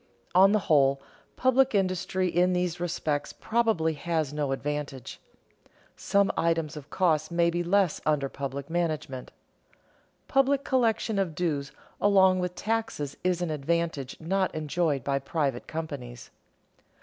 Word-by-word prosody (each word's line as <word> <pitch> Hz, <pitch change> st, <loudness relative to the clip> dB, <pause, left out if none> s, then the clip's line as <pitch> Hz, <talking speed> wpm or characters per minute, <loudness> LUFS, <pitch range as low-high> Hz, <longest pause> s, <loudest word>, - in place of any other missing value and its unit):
On 190 Hz, +2 st, +7 dB
the 215 Hz, -, +4 dB
whole, 140 Hz, -3 st, +4 dB, 0.4 s
public 260 Hz, -1 st, +3 dB
industry 185 Hz, -1 st, 0 dB
in 180 Hz, +1 st, +2 dB
these 180 Hz, -1 st, -1 dB
respects 155 Hz, -4 st, -2 dB
probably 220 Hz, -9 st, +1 dB
has 155 Hz, -1 st, -2 dB
no 145 Hz, -2 st, -1 dB
advantage. 140 Hz, -2 st, -4 dB, 0.8 s
Some 200 Hz, 0 st, +2 dB
items 165 Hz, -2 st, 0 dB
of 150 Hz, -1 st, -9 dB
cost 155 Hz, -3 st, +1 dB
may 170 Hz, 0 st, +2 dB
be 175 Hz, +1 st, -1 dB
less 185 Hz, -1 st, +2 dB
under 150 Hz, -3 st, +1 dB
public 140 Hz, 0 st, -5 dB
management. 155 Hz, -6 st, -2 dB, 1.0 s
Public 275 Hz, 0 st, +2 dB
collection 225 Hz, -5 st, +1 dB
of 175 Hz, -5 st, -1 dB
dues 145 Hz, -5 st, -1 dB, 0.3 s
along 190 Hz, -2 st, +5 dB
with 180 Hz, 0 st, -3 dB
taxes 220 Hz, -10 st, -2 dB
is 180 Hz, -1 st, +1 dB
an 170 Hz, -, -2 dB
advantage 155 Hz, -2 st, -2 dB
not 190 Hz, +3 st, -1 dB
enjoyed 155 Hz, -3 st, 0 dB
by 140 Hz, +1 st, 0 dB
private 140 Hz, -2 st, -2 dB
companies. 140 Hz, -7 st, -6 dB
165 Hz, 130 wpm, -27 LUFS, 145-185 Hz, 1.0 s, On